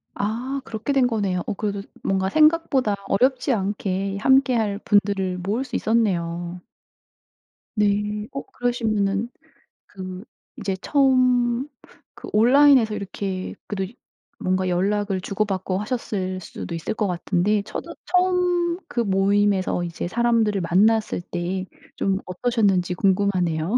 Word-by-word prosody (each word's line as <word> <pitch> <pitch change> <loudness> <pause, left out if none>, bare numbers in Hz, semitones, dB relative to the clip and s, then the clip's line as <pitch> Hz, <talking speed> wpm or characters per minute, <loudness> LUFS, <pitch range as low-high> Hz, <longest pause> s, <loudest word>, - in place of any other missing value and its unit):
아 245 +7 -2
그렇게 230 +4 -3
된 265 -2 +4
거네요. 200 -6 -1
어 - - -2
그래도 200 -1 -3 0.2
뭔가 190 0 0
생각보다 305 -6 +3
어렵지 255 +6 +2
않게 195 -1 -2
함께 265 +2 +4
할 205 -3 0
분들을 200 -3 +1
모을 205 +8 -1
수 250 -2 -7
있었네요. 175 -6 0 1.2
네. 210 0 +1
어 275 - -4
그러시면은 220 -3 -1 0.6
그 185 +1 -8 0.3
인제 195 -1 -3
처음 255 -2 +2 0.5
그 - - -10
온라인에서 250 0 +5
이렇게 195 -2 -4
그래도 195 +1 -4 0.4
뭔가 185 0 0
연락을 195 +1 0
주고 200 +3 -1
받고 190 -2 -2
하셨을 200 -5 -3
수도 170 - -7
있을 165 - -3
것 215 -2 -1
같은데 185 +3 +1
처도 205 - -7
처음 360 -1 +2
그 240 - -3
모임에서 195 -3 +2
이제 170 0 -4
사람들을 230 -3 +2
만났을 205 +3 +2
때 180 +2 -3 0.3
좀 195 -1 0
어떠셨는지 190 -3 +1
궁금하네요. 185 -1 +1
205 Hz, 280 characters per minute, -23 LUFS, 190-240 Hz, 1.2 s, 온라인에서